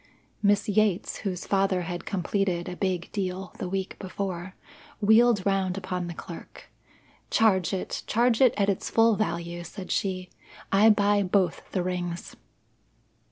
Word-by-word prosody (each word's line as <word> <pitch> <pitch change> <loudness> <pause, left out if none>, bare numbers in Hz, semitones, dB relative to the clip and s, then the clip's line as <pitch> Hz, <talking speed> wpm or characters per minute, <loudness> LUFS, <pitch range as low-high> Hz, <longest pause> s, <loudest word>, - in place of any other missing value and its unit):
Miss 205 -1 +3
Yates, 210 -2 +1
whose 185 -3 -4
father 195 -2 +1
had 175 0 -5
completed 185 -2 -1
a 180 - -5
big 185 -2 -2
"deal" 190 -2 -3
the 180 - -3
week 190 0 -3
before, 190 -1 -5 0.4
wheeled 220 -1 +5
round 195 -2 +1
upon 180 -2 -3
the 170 - -6
clerk. 170 - -10 0.6
"Charge 190 -6 +3
it! 190 -2 -3
charge 235 +1 +2
it 255 -2 +6
at 200 -1 +2
its 200 -2 -1
full 225 -1 +4
value," 170 -4 -3
said 185 +2 -8
she. 185 -2 -2 0.4
"I 205 +3 +6
buy 205 -1 +4
both 185 -2 0
the 185 - 0
rings." 175 -1 -4
190 Hz, 145 wpm, -27 LUFS, 180-205 Hz, 0.6 s, it